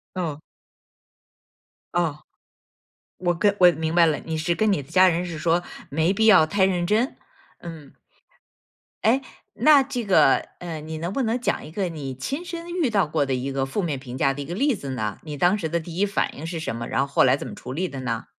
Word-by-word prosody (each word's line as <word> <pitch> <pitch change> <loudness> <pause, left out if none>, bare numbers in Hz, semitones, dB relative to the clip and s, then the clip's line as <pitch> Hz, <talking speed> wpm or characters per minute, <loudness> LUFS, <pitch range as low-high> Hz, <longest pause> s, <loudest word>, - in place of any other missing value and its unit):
哦。 155 -5 -3 1.5
哦。 165 -4 0 1.0
我 175 -1 0
跟 200 +4 +2
我 180 -1 +8
明 160 +1 -3
白 170 -1 +6
了， 150 -3 +1
你 160 -1 -4
是 165 +2 0
跟 215 +2 +1
你 145 - -2
的 135 - -20
家 185 0 +6
人 175 0 +1
是 170 -3 -6
说 170 +2 +1 0.3
没 160 +6 +1
必 220 +2 +1
要 190 -8 +7
太 190 +3 +2
认 180 -2 0
真， 220 +7 +1 0.4
嗯。 160 -5 -10 1.1
哎， 245 +5 +4 0.3
那 295 -3 +6
这 250 -4 -4
个， 190 -8 +4
嗯， 160 -3 -7
你 160 0 -5
能 170 +4 -4
不 270 - -1
能 235 +1 0
讲 - - -1
一 155 - -10
个 185 +1 -2
你 145 -5 -6
亲 275 - -4
身 340 0 -7
遇 345 -8 0
到 200 -6 +2
过 150 -1 0
的 135 - -3
一 130 +2 -2
个 135 0 0
负 135 +10 -2
面 155 -7 -2
评 130 -1 -8
价 135 0 +2
的 145 - -5
一 - - -6
个 170 +5 -6
例 275 +4 +2
子 140 -7 -7
呢？ 110 -5 -3
你 150 -2 -7
当 175 +7 +3
时 165 -6 -3
的 170 - 0
第 165 +1 -8
一 200 - +2
反 200 +1 -1
应 145 - -8
是 165 0 -4
什 160 -8 -4
么？ 115 0 -5
然 - - 0
后 135 - +1
后 140 - +2
来 130 +1 +4
怎 - - -7
么 - - -7
处 - - -8
理 180 +6 -2
的 135 - -7
呢？ 115 -3 -3
170 Hz, 250 characters per minute, -24 LUFS, 145-200 Hz, 1.5 s, 我